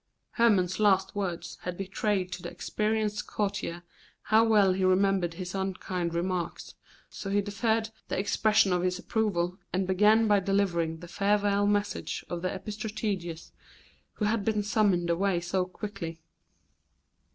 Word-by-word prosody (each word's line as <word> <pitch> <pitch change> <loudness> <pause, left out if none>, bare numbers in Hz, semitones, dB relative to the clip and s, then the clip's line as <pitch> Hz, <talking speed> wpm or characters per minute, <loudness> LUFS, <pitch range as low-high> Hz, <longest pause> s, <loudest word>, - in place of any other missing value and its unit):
Hermon's 200 -6 +2
last 195 -2 +3
words 185 -4 -4
had 180 -1 -5
betrayed 195 -1 -1
to 180 - -5
the - - -5
experienced 210 +3 -1
courtier 195 -4 -3 0.4
how 220 +1 +4
well 210 -4 +4
he 190 0 -1
remembered 185 -2 +2
his 180 0 -6
unkind 185 -3 -2
remarks, 175 0 -3 0.3
so 195 - -7
he 200 +1 +2
deferred 220 +2 0 0.2
the - - -2
expression 210 0 +3
of 180 - +1
his 180 0 0
approval, 185 -3 -1
and 190 +1 0
began 210 +4 +4
by 205 -1 +5
delivering 180 -4 0
the 175 - -9
farewell 205 +1 +2
message 205 0 -1
of 175 -1 -3
the 185 - -1
epistrategus, 205 -6 -4 0.6
who 210 - -2
had 215 0 +1
been 215 0 0
summoned 200 -5 +2
away 180 +1 +1
so 180 +2 -1
quickly. 180 -3 -6
195 Hz, 140 wpm, -28 LUFS, 180-210 Hz, 0.6 s, by